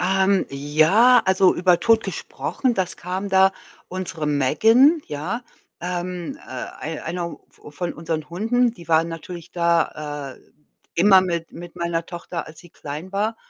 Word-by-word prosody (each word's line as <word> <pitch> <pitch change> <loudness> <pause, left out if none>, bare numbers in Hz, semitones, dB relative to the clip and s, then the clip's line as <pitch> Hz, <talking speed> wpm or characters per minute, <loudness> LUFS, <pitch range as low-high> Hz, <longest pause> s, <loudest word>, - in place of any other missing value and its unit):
Ähm, 190 +1 +2
ja, 155 - +4
also, 190 0 +4
über 175 -1 +3
Tod 225 +1 +3
gesprochen 255 -3 -2
das 190 -3 -2
kam 185 +3 -4
da 190 0 +5 0.4
unsere 180 -4 -3
Megan, 225 - +4
ja, 180 +12 -4 0.4
ähm, 180 -1 -4
äh, 130 - -6
ei 160 0 -5
einer 170 +1 -4
v - - -14
von 175 +3 -4
unseren 160 -1 -4
Hunden, 230 +7 +1
die 170 -7 -14
waren 165 0 +3
natürlich 165 0 -8
da, 150 -5 -1
äh, - - -21 0.5
immer 190 +2 +6
mit 170 -2 -3
mit 175 0 -10
meiner 170 -1 -2
Tochter, 170 -1 -6
als 160 0 -12
sie 175 - -16
klein 155 +6 -8
war. 215 +3 -1
175 Hz, 150 wpm, -22 LUFS, 160-195 Hz, 0.5 s, immer